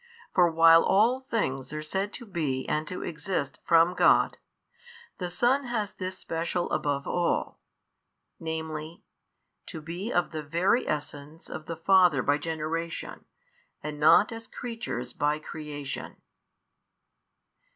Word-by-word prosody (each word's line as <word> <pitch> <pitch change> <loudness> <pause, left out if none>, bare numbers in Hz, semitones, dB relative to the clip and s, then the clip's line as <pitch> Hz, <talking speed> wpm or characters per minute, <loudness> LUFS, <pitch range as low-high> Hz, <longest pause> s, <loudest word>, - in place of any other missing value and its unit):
For 175 -2 +5
while 165 0 +7
all 225 +6 +3
things 135 - -2
are 155 0 -4
said 190 +6 -2
to 240 - -7
be 155 -10 -2
and 155 0 -1
to 180 - -5
exist 160 -4 -3
from 170 +1 +5
God, - - +4 0.8
the 180 -2 -3
Son 245 +9 +2
has 215 -4 -2
this 185 0 -5
special 170 +1 -2
above 140 -1 -1
all, 175 -1 -1 0.8
viz., 160 -1 -4 1.0
to 165 - -6
be 175 +8 -5
of 175 - +1
the 155 -1 -4
Very 170 - +1
Essence 150 +1 -5
of 155 - -7
the 165 - -4
Father 175 -5 +4
by 145 +1 +2
Generation 160 +1 -4 0.6
and 150 0 -5
not 160 +8 +6
as 225 0 -7
creatures 225 - -5
by 150 +1 +1
creation. 150 -2 -6
165 Hz, 130 wpm, -28 LUFS, 150-190 Hz, 1.0 s, while